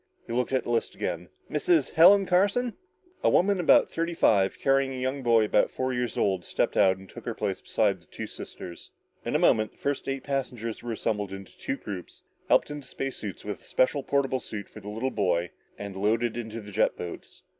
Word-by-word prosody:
He 115 - -6
looked 125 +2 0
at 130 - +1
the - - -3
list 115 - 0
again. 85 +1 -3 0.2
"Mrs. 150 -1 +2
Helen 195 +5 +7
Carson?" 205 +7 +2 0.5
A - - +5
woman 195 +1 +3
about 175 - +5
thirty 170 +1 -2
five, 100 - +3
carrying 135 0 +2
a 130 - -5
young 130 +2 -2
boy 115 -3 +4
about 105 - +3
four 130 0 -2
years 125 -1 -2
old, 95 -3 +1
stepped - - -1
out 95 -2 +4
and 95 0 -13
took - - -11
her 115 - -3
place 100 -3 -2
beside 100 -4 +1
the 85 - -23
two - - -6
sisters. 85 -1 -9 0.3
In - - -2
a - - +6
moment, 110 -1 +3
the - - -28
first 140 -1 -2
eight 135 -1 -2
passengers 125 -5 -3
were 120 - -5
assembled 105 -3 -2
into 95 -1 -9
two 135 - -3
groups, 95 -8 -8 0.3
helped - - +4
into 145 -3 -7
space 135 +1 -4
suits, 100 -4 -7
with 105 -2 -5
a - - -18
special 140 +2 +2
portable 135 -1 0
suit 105 -4 -7
for - - -12
the 105 - -8
little 115 +5 -2
boy, 90 -5 0 0.3
and 100 -1 -7
loaded 110 +4 +1
in 120 -2 -4
the 110 -2 -8
jet - - +2
boats. 85 - -8
115 Hz, 215 wpm, -27 LUFS, 100-135 Hz, 0.5 s, Helen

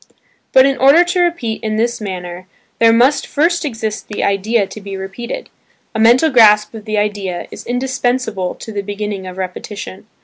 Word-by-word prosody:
But 260 0 +6
in 275 -1 +1
order 280 +7 +6
to 355 +1 -1
repeat 335 -11 -1
in 215 -1 -1
this 235 +1 -1
manner, 180 -2 -6 0.3
there 230 0 +6
must 255 +5 +3
first 340 +4 +1
exist 220 -6 -4
the 210 - -4
idea 200 +2 +1
to 215 - -10
be 195 -1 -6
repeated. 195 +5 -6 0.5
A 220 - -3
mental 245 +8 +5
grasp 210 -4 +5
of 220 -1 -9
the 215 -1 -2
idea, 200 -4 -2
is - - -10
indispensable 245 -6 -1
to 225 - -9
the 205 -1 -3
beginning 205 -1 -5
of 185 0 -8
repetition. 190 +1 -7
220 Hz, 175 wpm, -16 LUFS, 200-250 Hz, 0.5 s, But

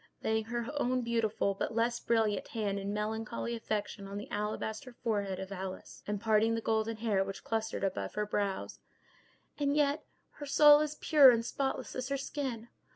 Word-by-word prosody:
laying 220 0 +1
her 235 +1 -3 0.2
own 255 +1 +1
beautiful, 225 -3 0
but 195 - -3
less 235 +1 +1
brilliant, 220 -4 +1
hand 205 -3 -2
in 200 +1 -3
melancholy 220 +2 -3
affection 205 -3 -3
on 200 +1 -6
the 205 - -6
alabaster 220 +4 -3
forehead 200 -4 -1
of 190 +1 -6
Alice, 190 -1 -7
and 205 -1 -1
parting 220 +1 +3
the - - -1
golden 220 0 0
hair 215 -4 +1
which 195 0 -7
clustered 225 -2 -2
about 195 -1 -2
her 210 0 0
brows; 200 -2 -2 0.8
"and 285 0 +1
yet 290 0 +2 0.3
her 290 - -8
soul 295 +1 +8
is 300 0 -1
pure 290 -4 +8
and 230 -2 +3
spotless 270 +2 -2
as 255 +1 -3
her 275 - 0
skin! 265 -5 -4
220 Hz, 175 wpm, -32 LUFS, 205-240 Hz, 0.8 s, soul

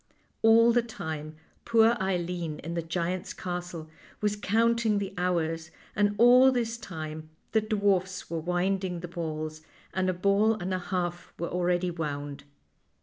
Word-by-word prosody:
All 230 +1 +6
the 240 +1 +4
time 160 -9 -6 0.3
poor 230 0 +4
Eileen 175 -4 -2
in 165 +3 -4
the 170 - -1
giant's 175 +2 -3
castle 175 -3 -5 0.3
was 210 -1 0
counting 225 +1 +2
the 200 -1 -3
hours, 165 -2 -1 0.3
and 205 0 +2
all 250 +3 +7
this 235 -2 -1
time 155 -5 -7 0.2
the 220 - +3
dwarfs 200 -3 0
were 165 - -3
winding 180 +1 -1
the 175 - -5
balls, 155 -2 -4 0.3
and 185 0 +1
a - - +1
ball 200 +4 +3
and 190 -2 -3
a 185 - 0
half 175 -1 -3
were 170 - -3
already 180 0 0
wound. 145 -3 -5
180 Hz, 145 wpm, -28 LUFS, 165-205 Hz, 0.3 s, all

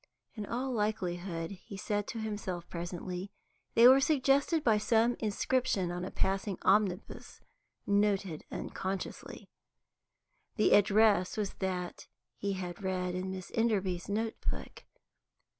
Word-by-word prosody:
In 210 -3 -6
all 255 +3 -2
likelihood, 180 -6 -2
he 195 +1 -9
said 205 +1 -2
to - - -5
himself 205 -5 -4
presently, 180 +2 -5 0.5
they 235 +1 +9
were 260 +2 +8
suggested 280 +2 +3
by 220 -3 +4
some 225 +3 +3
inscription 215 -3 0
on 175 0 -4
a 185 - -3
passing 195 0 -1
omnibus, 195 -1 +1 0.5
noted 200 -5 +1
unconsciously. 190 0 -5 1.1
The 215 - +4
address 205 -2 +4
was 205 -2 -2
that 180 -2 -3 0.3
he 200 0 -2
had 180 -1 -5
read 185 -1 -1
in 185 +1 -3
Miss 185 -1 -6
Enderby's 195 -6 0
note 220 +2 -1
book. - - -7
200 Hz, 125 wpm, -32 LUFS, 185-220 Hz, 1.1 s, they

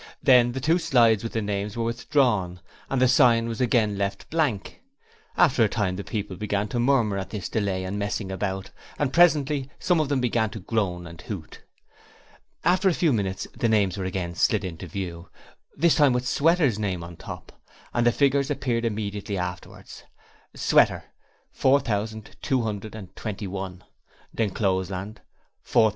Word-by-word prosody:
Then 125 -3 +5
the 130 - -3
two 160 +6 +2
slides 120 - +4
with 115 - -5
the 110 - -1
names 100 +1 -3
were 115 - 0
withdrawn, 115 -6 0 0.3
and 135 - 0
the 130 - +5
sign 120 -3 +4
was 115 0 -4
again 110 -5 +2
left 100 0 -3
blank. 145 -11 -1 0.6
After 130 -7 +4
a - - 0
time 100 -4 -1
the 100 - -5
people 105 -4 -4
began 105 +1 -2
to 120 - -2
murmur 120 -6 +2
at 95 - -3
all - - -26
this 105 -4 -5
delay 100 -4 -1
and 95 +2 -4
messing 100 -1 -3
about, 95 0 -3 0.3
and 135 -3 -1
presently 150 -5 +3
some 175 -2 +1
of 155 -3 0
them 140 -2 +1
began 115 -3 +1
to 110 - -8
groan 90 -4 -2
and 85 -2 -10
hoot. 90 -7 -8 1.0
After 185 +3 +3
a 175 - 0
few 160 -6 +2
minutes 95 -4 -2
the 115 - 0
names 100 -4 +2
were 95 -2 -4
again 90 -2 -3
slid 105 +3 +2
into 90 0 -6
view, 85 0 -6 0.5
this 165 +3 +4
time 145 -4 +4
with 125 0 -1
Sweater's 150 - +2
name 95 -5 -2
on 85 0 -9
top, - - -10 0.3
and 120 - +1
the 120 - +5
figures 140 +1 +2
appeared 125 -4 -1
immediately 105 -2 -3
afterwards: 90 0 -7 0.5
Sweater.................... - - +3 0.5
4,221 105 -5 -2 0.5
D'Encloseland....... 95 -1 -2
110 Hz, 155 wpm, -25 LUFS, 95-125 Hz, 1.0 s, Then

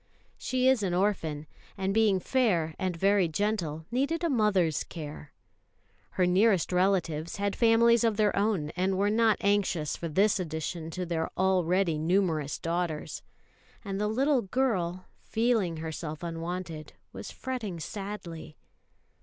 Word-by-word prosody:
She 255 0 0
is 260 -4 +4
an 185 -3 0
orphan; 165 -6 0 0.3
and 195 0 -1
being 215 -3 +3
"fair" 180 -9 +1
and 185 -3 -2
very 195 0 +3
gentle, 165 -3 -2
needed 280 +7 0
a 335 - +1
mother's 200 - +2
care. 150 -2 -8 0.9
Her 185 - +4
nearest 190 0 +3
relatives 175 -4 +1
had 200 0 -1
families 235 0 +4
of 225 -3 +1
their 210 -2 +2
own, 195 -7 0
and 185 +1 0
were 200 +2 +2
not 220 -1 +3
anxious 200 -7 +1
for 170 - -5
this 200 +6 +2
addition 160 -1 -4
to 180 +2 -4
their 165 -2 -2
already 185 -3 +2
numerous 160 -4 +1
daughters; 165 -2 -3 0.6
and 195 0 -3
the 210 - +1
little 265 +4 +2
girl, 185 -6 -1 0.2
feeling 220 -7 0
herself 160 0 -5
unwanted, 165 -1 -5 0.2
was - - -7
fretting 230 -9 -5
sadly. 180 -4 -7
185 Hz, 135 wpm, -28 LUFS, 165-210 Hz, 0.9 s, is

